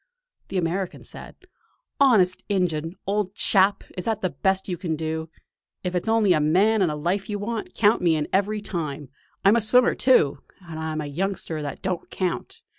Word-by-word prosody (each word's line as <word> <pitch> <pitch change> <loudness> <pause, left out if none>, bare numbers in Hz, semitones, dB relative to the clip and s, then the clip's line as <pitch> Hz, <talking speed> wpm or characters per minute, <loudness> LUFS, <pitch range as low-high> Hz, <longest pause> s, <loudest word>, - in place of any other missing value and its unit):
The 195 - -3
American 180 +2 -2
said: - - -9 0.6
"Honest 210 -10 +4
injun! 170 -4 -1
old 200 -1 -1
chap, 200 -2 +3
is 180 - -5
that 220 -2 -1
the 185 - 0
best 190 +7 0
you 180 - -2
can 165 -2 -3
do? 160 +1 -4 0.5
If 180 -1 -2
it's 180 +3 -2
only 220 -4 +4
a 155 - +2
man 195 +9 +3
and 180 - +3
a - - -3
life 175 +7 -2
you 205 - -2
want, 220 +2 -4
count 215 +1 +3
me 170 -2 +3
in 150 -1 -1
every 205 +2 +1
time. 150 -8 -5 0.4
I'm 200 +3 +7
a 235 - +3
swimmer, 245 +4 +4
too; 150 - +3 0.3
and 160 -1 -7
I'm 160 -1 -3
a - - -4
youngster 165 +1 -3
that 145 -2 -6
don't 185 -2 -3
count. 185 -2 -4
185 Hz, 190 wpm, -24 LUFS, 160-205 Hz, 0.6 s, I'm